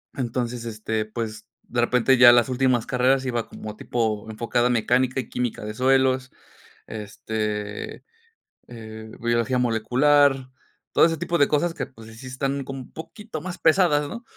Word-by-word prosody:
Entonces, 120 -1 -3
este, 110 -1 -3
pues, 110 -1 -6 0.2
de 120 -1 -1
repente 125 +2 +3
ya 120 -1 +9
las 120 +1 +4
últimas 125 -2 +1
carreras 130 0 +2
iba 120 -3 -2
como 105 -1 -8
tipo 110 -2 -2
enfocada 120 +2 0
a - - 0
mecánica 125 +2 +1
y 125 - -5
química 120 -3 -3
de 105 - -5
suelos, 130 +1 +2 0.6
este, 105 0 -5 0.7
eh, 110 -2 -10
biología 120 +2 +1
molecular, 130 +3 +3 0.4
todo - - +6
ese 165 - 0
tipo 170 +1 -1
de 140 - +4
cosas 160 +3 +1
que, - - -4
pues, 115 -4 -15
sí 110 - -13
sí 130 - -11
están 135 +2 -2
como 135 0 -6
un 125 - -12
poquito 165 +2 -8
más 180 +2 -6
pesadas, 155 -3 +3
¿no? 235 +1 -7
125 Hz, 165 wpm, -24 LUFS, 110-135 Hz, 0.7 s, ya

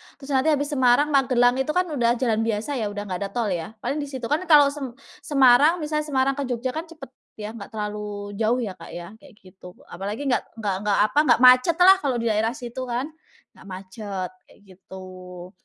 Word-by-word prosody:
Terus 280 0 -10
nanti 265 +2 +1
habis 290 -1 +1
Semarang, 260 +2 +3
Magelang 255 -2 +3
itu 300 +3 -2
kan 360 - +3
udah 240 -4 +1
jalan 230 -3 0
biasa 225 +4 -2
ya, 215 - -1
udah 205 0 -5
enggak 185 -3 -5
ada 200 - -4
tol 230 -4 -1
ya. 175 +4 -5
Paling 275 +5 -2
di 290 - -4
situ. 260 -3 -8
Kan 335 +5 0
kalau 290 -3 +6
sem 270 -5 -7 0.2
Semarang, 280 +1 +4
misalnya 300 0 -2
Semarang 270 -1 +1
ke 280 - -2
Jogja 250 +1 -3
kan 320 +3 -6
cepet 295 -6 -12 0.2
ya, 210 0 -7
enggak 220 -3 -9
terlalu 210 -1 -5
jauh 235 +3 +1
ya 205 - -4
Kak 165 - -11
ya, 175 +1 -8
kayak 280 -1 -17
gitu. 185 -1 -14 0.2
Apalagi 205 +8 -5
enggak 265 -3 -1
enggak 210 -4 -2
enggak, 200 - +2
apa, 215 - -2
enggak 300 -4 +4
macet 255 +6 +6
lah, 380 +1 +8
kalau 275 -7 -1
di 230 -1 0
daerah 220 +3 0
situ 255 -1 -7
kan, 250 +6 -3 0.4
nggak 190 - -17
macet, 190 0 -6 0.2
kayak - - -22 0.2
gitu. 185 -1 -11
245 Hz, 210 wpm, -23 LUFS, 205-280 Hz, 0.4 s, lah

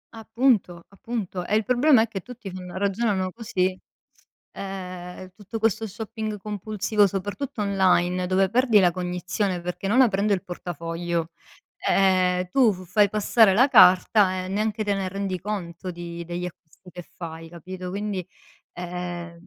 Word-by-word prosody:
Appunto. 225 -6 0
Appunto. 200 -3 -5
E 210 - 0
il 220 0 +1
problema 250 -1 +5
è - - -3
che 200 -3 -6
tutti 235 -3 -9
fanno 180 0 -8
ragionano 195 -1 0
così, 185 -5 -1 0.8
ehm, 185 -1 -7
tutto 215 +2 -7
questo 225 0 +1
shopping 215 +1 -5
compulsivo, 210 0 0
soprattutto 205 +7 -4
online, 185 -2 +2
dove 190 +1 +2
perdi 235 -2 +4
la 180 -2 +5
cognizione 180 +2 -2
perché 180 +2 -5
non 225 +7 +4
aprendo 210 -4 +3
il 195 -1 0
portafoglio, 170 -1 -4 0.6
ehm, 185 -1 +3
tu 245 -1 +4
f 185 -1 -9
fai 210 -2 +4
passare 210 0 +4
la 255 +7 +5
carta 185 -2 +5
e - - -7
neanche 215 +2 -1
te 205 -1 0
ne 195 -1 -2
rendi 195 -1 -3
conto 185 -3 -5
di 170 0 -7
degli 175 +1 -4
acquisti 180 +1 -14
che 175 - -9
fai, 165 -1 -9
capito. 180 +2 -8
Quindi 200 -2 -3 0.5
ehm 175 -1 -6
190 Hz, 150 wpm, -24 LUFS, 180-210 Hz, 0.8 s, problema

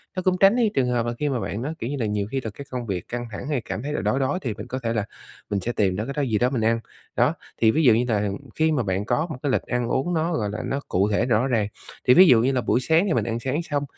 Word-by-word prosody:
nó 185 - -1
cũng 185 0 +2
tránh 195 +4 +6
đi 235 -4 +3
trường 130 -2 +1
hợp 120 -1 0
là 120 - -2
khi 150 -1 0
mà 130 - -1
bạn 110 0 -4
nó, 150 +5 -3
kiểu 115 - -3
như 145 - -2
là, 115 - 0
nhiều 105 -1 -1
khi 135 - 0
thực 110 -5 -6
cái 140 - -9
công 125 -2 -4
việc 95 -5 -4
căng 120 0 -4
thẳng 125 - -6
hay 140 -6 0
cảm 110 - -5
thấy 150 +1 -3
là - - -1
đói, 105 +6 +1
đói 135 +6 0
thì 115 -5 -2
mình - - -8
có 130 - -4
thể 115 0 0
là 105 -2 -1 0.4
mình 100 - 0
sẽ 115 +6 -2
tìm 95 -5 +1
đó 105 +3 -2
cái 140 - -4
đó 145 - -1
gì 115 -6 +1
đó 125 +3 +2
mình 125 -4 -1
ăn. 115 +1 +2 0.4
Đó, 125 +6 +3 0.3
thì 110 -1 +6
ví 160 +4 +1
dụ 120 -5 +7
như 120 +2 +2
nà 105 -4 0 0.3
khi 160 0 +2
mà 130 -6 +1
bạn 95 +1 -1
có 140 +8 0
một 135 - -5
cái 140 - +1
lịch - - +2
ăn 120 -1 -2
uống 135 +9 0
nó, 165 +1 0
gọi 105 -8 -1
là, 105 - -4
nó 140 - -1
cụ 100 +3 +1
thể 105 +3 +1
rõ 120 +1 +2
ràng, 110 -5 +1 0.4
thì 125 - +8
ví 185 +6 +8
dụ 115 -7 +6
như 130 - +2
là 130 -2 0
buổi 120 - +1
sáng 160 +7 +3
thì 165 - +1
mình - - +1
ăn 115 0 -2
sáng 135 +7 -2
xong, 145 -3 -2
125 Hz, 335 wpm, -24 LUFS, 110-145 Hz, 0.4 s, thì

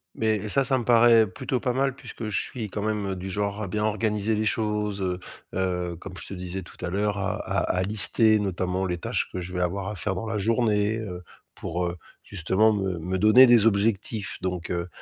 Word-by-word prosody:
Mais 110 -1 0
ça, 135 +3 +2
ça 135 0 +2
me 120 - -2
paraît 115 -2 +6
plutôt 125 +7 -3
pas 125 0 -1
mal 135 0 +1
puisque 120 -4 -8
je 100 - 0
suis 115 -5 -6
quand 105 +2 -4
même, 105 -1 -1
heu, - - -2
du 95 +1 -6
genre 100 +2 -2
à 100 - -3
bien 105 +3 -2
organiser 110 0 0
les 110 - 0
choses, 105 -2 -1
heu 90 -1 -1 0.3
heu, 90 -2 -1
comme 90 +1 -9
je 85 - -8
te - - -7
disais 90 0 -5
tout - - -15
à 90 - -1
l'heure 105 +2 0
à 100 - -1
à - - -3 0.2
à - - +1
lister 110 +2 +3
notamment 95 -1 -1
les 90 -1 -2
tâches - - -2
que 95 - -4
je 90 +1 -7
vais 90 - -1
avoir 95 +2 -1
à 105 - -4
faire 95 +1 -2
dans 110 - -4
la 110 -1 -2
journée, 110 0 +1
heu, 90 -5 -6 0.3
pour, 90 +2 -3
heu, 85 0 -3 0.3
justement 100 +4 +2
me 95 -3 -1
me 90 +3 -2
donner 110 +6 +8
des 115 -2 +6
objectifs 105 0 0
donc 90 -2 -3
heu 85 0 -2
100 Hz, 230 wpm, -26 LUFS, 90-110 Hz, 0.3 s, donner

